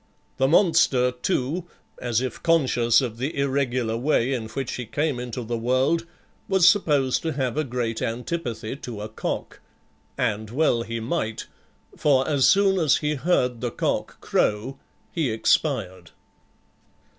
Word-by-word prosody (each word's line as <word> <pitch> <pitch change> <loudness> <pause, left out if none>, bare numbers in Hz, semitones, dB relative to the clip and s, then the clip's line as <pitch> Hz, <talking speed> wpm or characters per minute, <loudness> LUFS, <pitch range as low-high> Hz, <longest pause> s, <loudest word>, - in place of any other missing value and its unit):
The 135 - +3
monster, 135 -7 +4
too, 130 +6 -2 0.3
as 120 -1 0
if 130 -3 -4
conscious 130 -8 +3
of 120 -4 -4
the 140 +4 -3
irregular 130 -4 0
way 130 0 +1
in 115 -4 -3
which 125 +4 -4
he 125 -2 -5
came 145 0 -1
into 125 0 -5
the 115 +1 -3
world, 130 +8 +1 0.4
was 190 -2 +5
supposed 145 -10 +3
to 160 -1 -2
have 130 -3 -2
a 155 - +1
great 120 -4 -3
antipathy 120 -1 -3
to 120 -7 -7
a 105 - -5
cock; 110 - -4 0.6
and 110 -3 -1
well 120 -1 +2
he 115 0 -4
might, 115 -2 -3 0.5
for 135 -3 +2
as 140 -3 +3
soon 195 -1 +4
as 155 -5 +3
he 150 0 -1
heard 125 -5 0
the 125 - -1
cock - - -2
crow 115 +6 0 0.3
he 160 -6 -1
expired. 110 - 0
130 Hz, 145 wpm, -24 LUFS, 115-150 Hz, 0.6 s, was